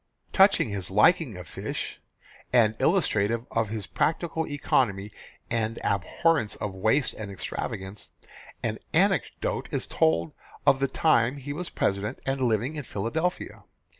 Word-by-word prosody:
Touching 195 - +5
his 100 -3 -3
liking 115 - +4
for 90 - -7
fish, 80 - -5 0.5
and 115 -4 +5
illustrative 115 - +2
of 115 -2 0
his 105 -2 -4
practical 160 0 -1
economy 105 -8 0 0.4
and 115 -1 -1
abhorrence 105 - +1
of 105 -2 -4
waste 110 +9 +2
and 110 -2 -7
extravagance, 95 +1 -5 0.5
an - - -2 0.2
anecdote - - +1
is - - -1
told 80 0 +1 0.3
of 135 - +5
the 135 - +2
time 130 -2 +2
he 140 +1 -5
was 175 +3 -5
President 100 +5 -1
and 135 0 -1
living 120 +5 0
in 150 - -4
Philadelphia. 145 - -3
115 Hz, 135 wpm, -27 LUFS, 100-145 Hz, 0.5 s, Touching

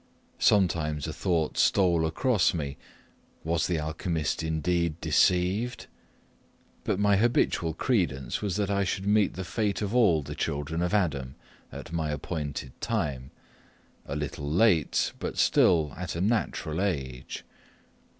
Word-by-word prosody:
Sometimes 80 -7 +2
a - - -4
thought 85 -4 -1
stole 85 -4 +3
across 90 - +2
me 70 -4 -3 0.7
Was 80 0 0
the 85 - 0
alchymist 80 +1 -2
indeed 80 +1 -1
deceived? 95 +10 +1 1.0
But - - 0
my 100 0 +3
habitual 95 -7 +1
credence 70 - 0
was, 100 -4 -2
that 100 -1 0
I 100 0 +1
should 95 +1 -2
meet 105 -1 +2
the 95 - -4
fate 105 +1 -1
of 105 0 -3
all 95 -11 +4
the - - -6
children 75 +4 -2
of 90 +4 0
Adam 70 -10 -1 0.4
at - - -9
my 80 -2 -1
appointed 75 -3 -4
time 75 - -2 0.8
a - - -4
little 75 0 -4
late, 85 - +2
but - - -4
still 80 -4 +3
at 90 -1 -5
a 85 - -2
natural 95 -6 -1
age. 65 -10 -3
85 Hz, 135 wpm, -27 LUFS, 75-100 Hz, 1.0 s, all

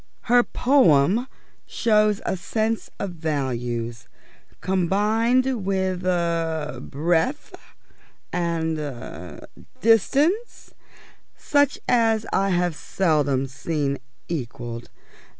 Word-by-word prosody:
Her 245 +1 +4
poem 235 - +3 0.4
shows 215 -2 +2
a - - 0
sense 220 +5 -2
of 200 - -3
values 120 -8 -3 0.5
combined 220 +6 +1
with 190 -1 -1
er 165 -3 -1
breadth, 170 - -1 0.8
and 165 -2 -1
er 90 - -7 0.4
distance, 285 - +2 0.6
such 285 -1 +2
as 225 -2 +3
I 195 0 +2
have 175 -2 +1
seldom 150 -7 +1
seen 140 +1 -2 0.3
equalled. 120 -6 -5
175 Hz, 80 wpm, -23 LUFS, 145-225 Hz, 0.8 s, Her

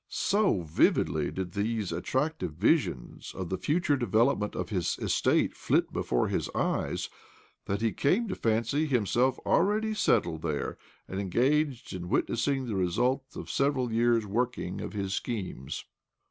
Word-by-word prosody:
So 200 - +2
vividly 75 -1 +2
did 95 -2 -4
these 105 0 -1
attractive 130 - -1
visions 85 - 0
of 95 -3 -4
the 95 - -1
future 160 -1 +1
development 115 -3 +1
of - - -3
his 90 -6 -1
estate - - +1
flit - - +1
before 60 - 0
his - - -1
eyes - - -1 0.6
that 100 +2 -2
he 115 -1 +2
came 190 - +1
to - - -2
fancy 115 +7 +1
himself 125 0 +2
already 215 +4 +2
settled 80 - +1
there, 75 -3 -3 0.3
and 95 - -4
engaged 130 - +1
in 90 -1 -5
wit - - +2
nessing 135 +2 0
the 115 - -3
result 120 +9 +1
of - - -6
several 135 -4 +1
years' 115 -1 +3
working 110 -3 -2
of - - -6
his 100 -2 -2
schemes. 95 - -4
115 Hz, 145 wpm, -29 LUFS, 95-140 Hz, 0.6 s, years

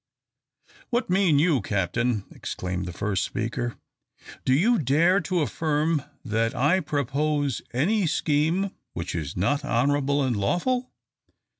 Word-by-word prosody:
"What 240 -6 0
mean 185 -5 +4
you, 150 -4 +3
Captain?" 105 +3 -1
exclaimed 90 0 -4
the - - -4
first 95 +2 -1
speaker. 120 +1 -3 0.7
"Do - - +2
you 220 - +3
dare 160 +8 +3
to 180 0 -1
affirm 155 +1 0 0.2
that 115 +1 0
I 145 +9 +3
propose 145 -2 -1
any 180 - +1
scheme 160 +6 +1 0.2
which 85 +1 -4
is 80 -2 -4
not 140 +11 +1
honourable 140 +2 +1
and 130 -3 0
lawful? 245 - 0
145 Hz, 125 wpm, -25 LUFS, 115-165 Hz, 0.7 s, mean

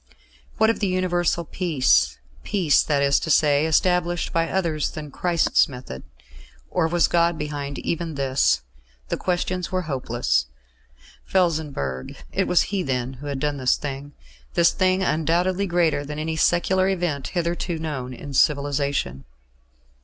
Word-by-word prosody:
What 220 +1 +4
of 225 - -6
universal 180 -2 +1
peace 130 - +2 0.3
peace, 175 -8 +3
that 145 -2 +1
is 140 0 +3
to - - -5
say, 150 0 +4
established 175 +2 +1
by 165 0 +1
others 165 -6 0
than 150 -2 -8
Christ's 170 +1 +2
method? 125 - -8 0.7
Or 165 -3 +1
was 170 0 +2
God 170 -1 +2
behind 145 -2 -4
even 165 -2 -3
this? 130 - +1 0.5
The - - -1
questions 180 0 -2
were 185 -1 -1
hopeless. 120 - -1 0.8
Felsenburgh 150 - -1 0.2
it - - 0
was 180 - +4
he 195 - +1
then 130 -4 -2
who 145 - -7
had 140 -2 -3
done 145 0 -1
this 130 -2 +2
thing 140 0 -6 0.4
this 170 -1 +5
thing 185 0 +1
undoubtedly 175 +5 +1
greater 170 -5 +1
than 150 +1 -6
any 160 +1 -2
secular 185 +4 +2
event 170 -7 -1
hitherto 170 0 -1
known 145 -6 -4
in 140 +3 -8
civilisation. 140 - +1
155 Hz, 140 wpm, -23 LUFS, 140-175 Hz, 0.8 s, this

